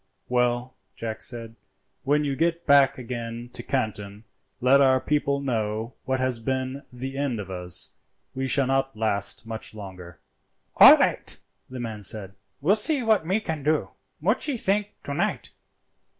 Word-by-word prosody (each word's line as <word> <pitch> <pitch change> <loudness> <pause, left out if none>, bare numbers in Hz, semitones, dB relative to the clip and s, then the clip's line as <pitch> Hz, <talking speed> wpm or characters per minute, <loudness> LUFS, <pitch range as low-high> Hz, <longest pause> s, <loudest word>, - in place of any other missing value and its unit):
"Well," 125 0 +1 0.2
Jack 110 -1 -5
said, 115 -2 -5 0.5
"when 145 +2 +2
you 140 -2 -1
get 170 +3 0
back 140 -2 +5
again 120 -1 -6
to - - -5
Canton 105 -5 -3 0.4
let 135 +3 +5
our 130 -1 +5
people 140 0 0
know 115 -3 -2
what 130 0 0
has 130 -2 +1
been 130 +3 -2
the 135 +2 -6
end 135 -6 -1
of 95 -2 -7
us; 90 -1 -1 0.4
we 135 0 -2
shall 135 +1 +3
not 135 -2 0
last 100 0 -1
much 110 -1 -6
longer." 90 -5 -10 0.6
"All - - +11
light," - - +1 0.3
the 130 0 -7
man 110 -3 -5
said, 100 -2 -2 0.3
"will 170 +8 +4
see 255 +6 +3
what 220 -8 +2
me 190 +4 +2
can 160 -8 -4
do. 150 +2 0 0.3
Muchee 235 - 0
think 205 0 0
to 140 - -4
night!" - - -2
130 Hz, 155 wpm, -25 LUFS, 110-140 Hz, 0.6 s, All